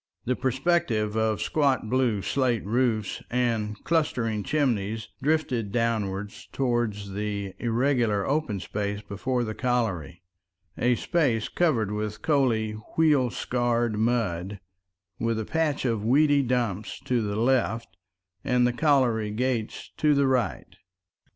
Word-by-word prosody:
The 125 - +1
perspective 130 -5 0
of 110 -4 +1
squat 140 -7 +1
blue 120 -5 +1
slate 125 -6 0
roofs 110 -2 0
and 115 -4 0
clustering 120 -10 0
chimneys 110 -6 -1
drifted 130 -8 0
downward 105 -4 -1 0.2
towards 120 -6 -1
the 100 -1 -3
irregular 120 -4 +1
open 140 -8 0
space 100 +3 -3
before 120 +5 -2
the 110 -2 -3
colliery—a 90 - -2
space 130 -9 0
covered 125 - +1
with 105 0 -4
coaly, 125 -8 +2 0.3
wheel 150 -6 +4
scarred 120 -2 0
mud, 105 -5 0 0.6
with 115 -1 0
a 110 - -2
patch 160 -2 0
of 115 -4 0
weedy 145 +4 +4
dump 120 -6 -1 0.2
to 125 -2 +1
the 100 -1 -2
left 115 -1 0 0.5
and 125 -2 +2
the 125 - +2
colliery 125 -7 +2
gates 115 0 -2
to 150 -1 +3
the 140 0 +3
right. 125 -6 -1
115 Hz, 120 wpm, -26 LUFS, 105-130 Hz, 0.6 s, wheel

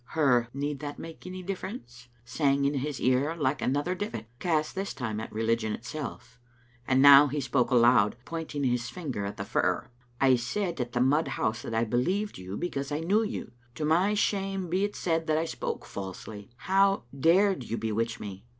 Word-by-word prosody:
Her" 125 -6 +4
Need 140 +1 -3
that 145 0 -6
make 165 +2 -9
any 185 0 -7
difference?" 180 - -7 0.2
sang 140 +2 +1
in 140 - +2
his 140 0 -3
ear 130 +6 +2
like 145 -4 0
another 145 +7 0
divit, 120 - -4
cast 155 -3 0
this 195 +1 -4
time 110 -5 -3
at 110 - -6
religion 110 0 0
itself, 125 0 -7 0.5
and 130 +1 +4
now 140 0 +10
he 145 +2 -2
spoke 130 -1 +1
aloud, 120 -4 +5
pointing 160 -3 -4
his 125 -2 0
finger 135 - -4
at 100 - -6
a - - -3
fir: - - 0 0.3
"I 135 -1 +5
gaid 170 - -2
at 120 -1 -4
the 120 - +1
mud 145 +5 +3
house 110 +2 -1
that 115 - -5
I 115 - +2
believed 155 - -1
you 95 +2 -6
because 140 -5 -3
I 150 +2 -1
knew 200 +7 +2
you. 225 +1 -4 0.2
To 150 - -2
my 180 +7 +3
shame 195 -3 -1
be 185 +3 +1
it 205 0 -2
said 165 -2 -1
that 155 0 +2
I 160 - +1
spoke - - -4
falsely. 100 +1 -8
How 195 +8 +2
dared 175 +1 +3
you 115 - -3
bewitch 115 +1 -2
me? 100 +2 -8
140 Hz, 190 wpm, -28 LUFS, 120-170 Hz, 0.5 s, now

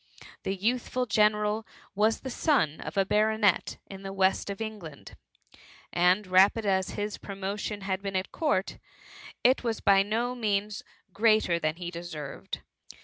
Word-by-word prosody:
The 195 - -2
youthful 245 +5 -1
general 210 0 +2 0.3
was 215 +2 +2
the 260 - -5
son 240 - +1
of - - -7
a 195 - +4
ba« 210 - +1
ronet 220 -3 +1
in 195 -1 -10
the 195 0 -6
West 195 0 +1
of 200 - -4
England^ 210 -9 -7 0.8
and 180 +4 +3
rapid 190 +4 +4
as 190 -1 +1
his 205 0 -3
promotion 200 +1 -4
had 195 0 -2
been 195 -1 -4
at 185 0 -2
court, 295 - -1 0.6
it 255 +2 +4
was 230 -2 -1
by 195 -1 +5
no 230 +5 -1
means 210 -3 -1 0.3
greater 215 -4 +3
than 155 -1 -1
he 175 0 -6
deserved. 160 -5 -7
200 Hz, 150 wpm, -28 LUFS, 190-220 Hz, 0.8 s, by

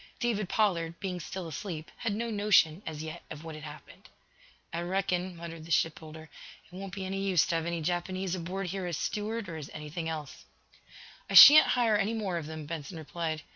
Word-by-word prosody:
David 220 -6 -1
Pollard, 170 -6 0
being 185 -2 -4
still 175 +1 -6
asleep, 160 0 -6
had 220 -3 -2
no 230 +1 -3
notion, 205 -5 +3
as 155 -1 -5
yet, 160 +2 -7
of 155 0 -8
what 160 -1 -7
had 155 0 -9
happened. 150 -2 -12 0.6
"I 170 - -2
reckon," 180 0 -1
muttered 165 -1 -8
the 165 - -12
shipbuilder, 160 0 -1 0.4
"It - - -23
won't 195 0 -7
be 195 -1 -4
any 195 +1 -3
use 185 -5 +3
to 180 - -2
have 165 0 -3
any 170 -1 -2
Japanese 180 +2 -2
aboard 185 +2 -4
here 190 0 -3
as 170 -3 -3
steward, 215 +4 -3
or 165 -2 -6
as 150 -3 -8
anything 155 +2 -5
else." 155 -3 -7 0.8
"I - - -2
shan't 305 +2 +11
hire 225 -4 +3
any 215 +3 0
more 195 -5 -2
of 150 - -7
them," 155 -1 -7
Benson 160 +2 -6
replied. 160 0 -4
175 Hz, 200 wpm, -30 LUFS, 160-195 Hz, 0.8 s, shan't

